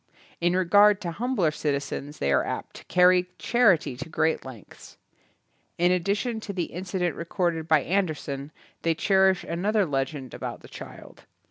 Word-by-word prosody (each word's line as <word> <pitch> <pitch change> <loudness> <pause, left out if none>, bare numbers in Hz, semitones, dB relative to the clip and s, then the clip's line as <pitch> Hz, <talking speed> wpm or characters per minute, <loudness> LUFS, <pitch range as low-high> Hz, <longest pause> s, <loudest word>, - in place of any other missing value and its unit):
In 175 +1 +1
regard 205 +3 +5
to 175 -3 -3
humbler 210 -4 0
citizens 145 -1 -3
th^ 70 - 0
are 65 - +3
apt - - -5
to. - - -13
carry 180 0 +4
charity 190 - +3
to 140 +5 -7
great 160 0 0
lengths. 125 -6 -12 0.8
In 175 +1 +3
addition 200 +6 0
to 215 -2 -6
the 180 -3 -3
incident 180 0 -2
recorded 170 -1 -2
by 155 -4 +4
Andersen 155 -6 -2 0.3
they 165 -1 +1
cherish 190 +1 +3
an 170 +2 -4
other 210 -1 +2
legend 135 -2 -3
about - - -6
the - - -13
child. - - -11
175 Hz, 155 wpm, -26 LUFS, 155-190 Hz, 0.8 s, regard